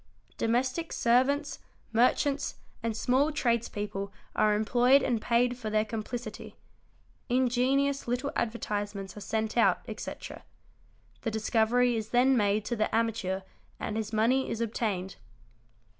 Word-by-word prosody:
Domestic 255 +8 0
servants, 275 +4 +2 0.3
merchants, 275 +4 +2 0.3
and 225 -1 -2
small 270 +7 +2
tradespeople 215 -7 -1 0.2
are 215 -1 +3
employed 245 +5 +4
and 230 -3 0
paid 245 +2 +1
for 220 -3 -4
their 215 0 +2
complicity; 230 +3 -6 0.7
ingenious 260 +3 +2
little 250 +4 -1
advertisements 205 -4 -3
are 210 - -8
sent 220 +2 -2
out, 235 - +4
etc., - - -7 0.8
the 225 - -1
discovery 225 +2 +2
is 220 -1 -3
then 255 +2 +4
made 205 -2 +2
to 240 - -1
the 215 0 0
amateur 220 -4 0 0.4
and 215 - -3
his 220 -1 -3
money 235 +5 +2
is 225 - -3
obtained. 210 -5 -2
235 Hz, 125 wpm, -29 LUFS, 215-250 Hz, 0.8 s, employed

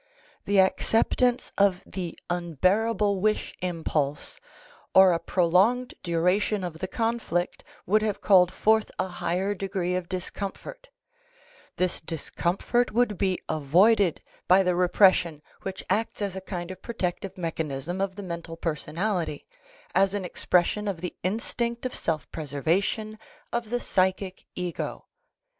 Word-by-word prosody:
The 200 -1 +3
acceptance 235 +5 +2
of 195 -2 +3
the 180 -3 -5
unbearable 190 +5 +1
wish 215 +2 0
impulse 160 -5 -2 0.6
or 190 -1 +8
a 165 - 0
prolonged 195 +10 +2
duration 180 +4 +1
of 165 -3 -5
the 185 - -3
conflict 225 -6 -1 0.2
would 215 +4 +3
have 215 -2 -1
called 180 -3 +5
forth 220 0 +2
a - - 0
higher 185 +2 -1
degree 190 -2 -2
of 180 -1 -2
discomfort; 200 - -5 0.9
this 185 -1 0
discomfort 175 - -1
would 230 -2 +2
be 190 -2 0
avoided 175 +6 +3 0.2
by 190 +2 +6
the 180 -1 +2
repression 175 -3 +4 0.2
which 190 -1 -5
acts 220 +2 -1
as 200 -3 -2
a 190 - -5
kind 180 -2 -5
of 185 - -10
protective 190 -4 -3
mechanism 165 0 -3
of 195 -1 -1
the 205 - -7
mental 170 -2 -6
per 165 -1 -1
sonality, 165 +2 -2 0.5
as 195 +1 +3
an 200 -2 -2
expression 180 +4 +1
of 185 -5 -3
the 180 - -5
instinct 235 +5 -2
of 255 - -2
self 160 -3 -2
preservation 170 +9 -1 0.3
of 235 -2 -2
the 245 +1 0
psychic 190 -2 0
ego. 180 -1 -4
185 Hz, 135 wpm, -26 LUFS, 175-210 Hz, 0.9 s, or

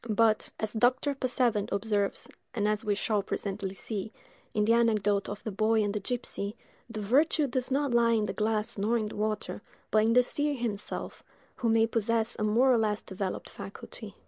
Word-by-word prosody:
But, 220 0 +3
as 215 -1 -1
Dr. 250 +5 +2
Passavent 245 -5 0
observes, 205 0 0 0.3
and 210 -2 +1
as 210 0 0
we 210 -2 +1
shall 210 0 0
presently 195 0 -4
see, 210 +1 -4 0.4
in 210 -1 +1
the 230 - +4
anecdote 210 -4 +2
of 205 0 -6
the 220 - -3
boy 215 +2 +2
and 205 -1 -1
the 210 - -1
gipsy, 210 -2 -3 0.3
the 220 -2 -5
virtue 290 +8 +3
does 255 -1 0
not 275 -1 +1
lie 235 -1 +4
in 215 -2 +2
the 195 - -3
glass 215 0 -1
nor 220 +4 +2
in 220 - -1
the 210 - -6
water, 215 0 -2 0.3
but 215 0 +4
in 225 +1 +3
the 250 +1 +6
seer 290 +3 -1
himself, 230 -5 -4 0.4
who 235 - 0
may 225 0 +4
possess 230 0 0
a - - 0
more 240 +5 +4
or 235 - +3
less 210 -1 0
developed 190 0 -4
faculty. 200 +1 -9
220 Hz, 195 wpm, -29 LUFS, 210-235 Hz, 0.4 s, the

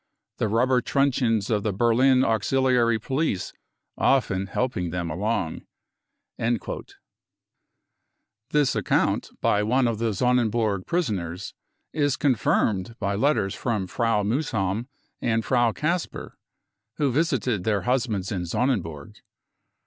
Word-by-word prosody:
the - - 0
rubber 125 +4 +2
truncheons 125 -6 +1
of 105 -2 +2
the 105 - -1
Berlin\uxiliary 120 +1 +3
police 130 - -2 0.5
often 100 -8 +2
helping 95 -5 -2
them 85 -1 -3
along." 100 -1 -2 2.9
This 145 -3 +2
account - - +1
by 105 - +2
one 125 +4 +2
of 115 -2 -2
the 115 -1 0
Sonnenburg 115 -4 +1
prisoners 100 - -2 0.4
is 145 -2 +1
confirmed 115 -6 +1
by 100 -1 -1
letters 100 -3 +1
from 110 -6 -2
Frau 115 +2 0
Muhsam 110 -3 -1 0.3
and 115 -1 0
Frau 120 -3 +3
Kasper, 165 - -3 0.6
who 145 -3 +1
visited 130 - 0
their 105 -2 +1
husbands 120 -7 0
in 90 -3 -3
Sonnenburg. 85 - -2
115 Hz, 105 wpm, -25 LUFS, 100-130 Hz, 2.9 s, Berlin\uxiliary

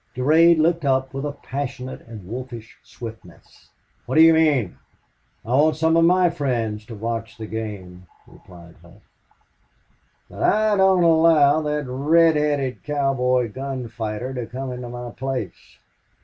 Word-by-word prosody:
Durade 160 +6 +4
looked 165 +1 +1
up 135 -1 0
with 135 +2 -4
a - - -3
passionate 135 -2 -6
and 110 -5 -10
wolfish 120 +1 -8
swiftness. 110 -7 -13 0.4
"What 130 - -3
do 160 - +7
you 165 0 +7
mean?" 145 - +1 0.7
"I - - -10
want 150 +5 +3
some 160 +1 +1
of 165 - +4
my 180 0 +3
friends 115 -7 -3
to 115 - -8
watch 115 +1 -5
the 110 - -7
game," 100 -5 -7 0.2
replied 85 -2 -16
Hough. 85 +5 -19 1.2
"But - - -11
I 215 0 +2
don't 190 -2 +4
allow 160 -3 +4
that 150 -1 -2
red 155 +6 +3
headed 145 -3 -1
cowboy 130 -5 0
gun 130 -1 -5
fighter 115 +2 -5
to 125 -3 -5
come 130 +2 -6
into 125 -1 -7
my 120 0 -7
place." 130 - -6
130 Hz, 150 wpm, -22 LUFS, 115-155 Hz, 1.2 s, do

